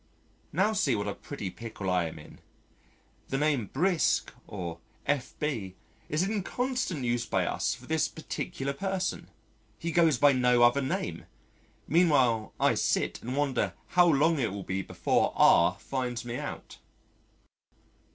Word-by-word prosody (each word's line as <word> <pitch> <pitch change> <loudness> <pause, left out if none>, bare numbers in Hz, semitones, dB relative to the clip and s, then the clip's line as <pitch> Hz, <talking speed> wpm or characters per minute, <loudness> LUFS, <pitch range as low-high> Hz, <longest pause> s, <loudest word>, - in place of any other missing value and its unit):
Now 195 +7 +2
see 140 - +2
what 100 -1 -2
a 100 - -2
pretty 105 -10 -6
pickle 110 -3 -7
I 90 -2 +2
am 80 0 -6
in: 75 - -13 0.9
the 135 - 0
name 145 -7 +1
"Brisk" 175 - +1
or 85 -4 -6 0.3
"F.B." 130 -7 -2 0.3
is 155 +4 +1
in 205 +1 -1
constant 250 - -2
use 120 0 0
by - - +1
us - - -1
for 125 +2 -15
this 160 +2 +1
particular 140 -3 -4
person 185 0 -3 0.5
he 170 +6 -3
goes 165 -5 +4
by 145 +3 +6
no 125 -1 +4
other 120 +4 +5
name, 130 - -3 0.6
meanwhile 135 - +3
I - - +4
sit - - 0
and 125 +3 -4
wonder 130 -10 0 0.2
how 175 -1 +5
long 160 +1 +3
it 115 -6 0
will 100 0 -5
be 95 +1 -2
before - - 0
R 90 +2 +5
finds 125 -2 -3
me 120 0 -4
out. - - -7
135 Hz, 150 wpm, -29 LUFS, 115-160 Hz, 0.9 s, by